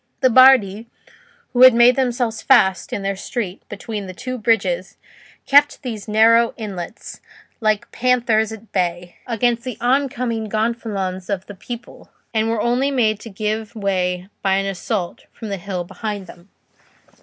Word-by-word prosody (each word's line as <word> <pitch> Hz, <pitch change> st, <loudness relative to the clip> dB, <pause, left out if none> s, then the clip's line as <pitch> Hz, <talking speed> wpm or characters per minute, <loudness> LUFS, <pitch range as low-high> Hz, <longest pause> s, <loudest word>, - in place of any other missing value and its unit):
The 260 Hz, -2 st, +4 dB
Bardi, 235 Hz, -4 st, +5 dB, 0.7 s
who 245 Hz, -, +1 dB
had 255 Hz, -2 st, +9 dB
made 240 Hz, +1 st, +6 dB
themselves 245 Hz, -4 st, -1 dB
fast 190 Hz, -8 st, +3 dB
in 200 Hz, -, -3 dB
their 195 Hz, 0 st, -1 dB
street 195 Hz, -1 st, -5 dB
between 210 Hz, -3 st, -6 dB
the 185 Hz, -, -9 dB
two 255 Hz, +3 st, -5 dB
bridges, 195 Hz, -4 st, 0 dB, 0.5 s
kept 290 Hz, +1 st, +4 dB
these 225 Hz, -5 st, -6 dB
narrow 225 Hz, +2 st, +4 dB
inlets, 200 Hz, -3 st, -7 dB, 0.4 s
like 215 Hz, -2 st, 0 dB
panthers 235 Hz, -3 st, +1 dB
at 220 Hz, 0 st, -11 dB
bay, 175 Hz, -1 st, -2 dB
against 235 Hz, 0 st, 0 dB
the 255 Hz, -4 st, -6 dB
oncoming 245 Hz, -3 st, -1 dB
gonfalons 215 Hz, -4 st, -2 dB
of 195 Hz, -2 st, -2 dB
the 205 Hz, -, -10 dB
people, 240 Hz, +4 st, -10 dB, 0.2 s
and 220 Hz, 0 st, +1 dB
were 225 Hz, -2 st, 0 dB
only 245 Hz, +4 st, +1 dB
made 220 Hz, -6 st, +1 dB
to 230 Hz, -, -10 dB
give 215 Hz, +2 st, -4 dB
way 185 Hz, -3 st, -1 dB
by 195 Hz, -1 st, +2 dB
an 195 Hz, 0 st, 0 dB
assault 195 Hz, -1 st, -4 dB
from 220 Hz, -, -8 dB
the 200 Hz, -, -3 dB
hill 185 Hz, -1 st, -4 dB
behind 200 Hz, +2 st, -6 dB
them. 175 Hz, +2 st, -15 dB
220 Hz, 155 wpm, -20 LUFS, 195-240 Hz, 0.7 s, had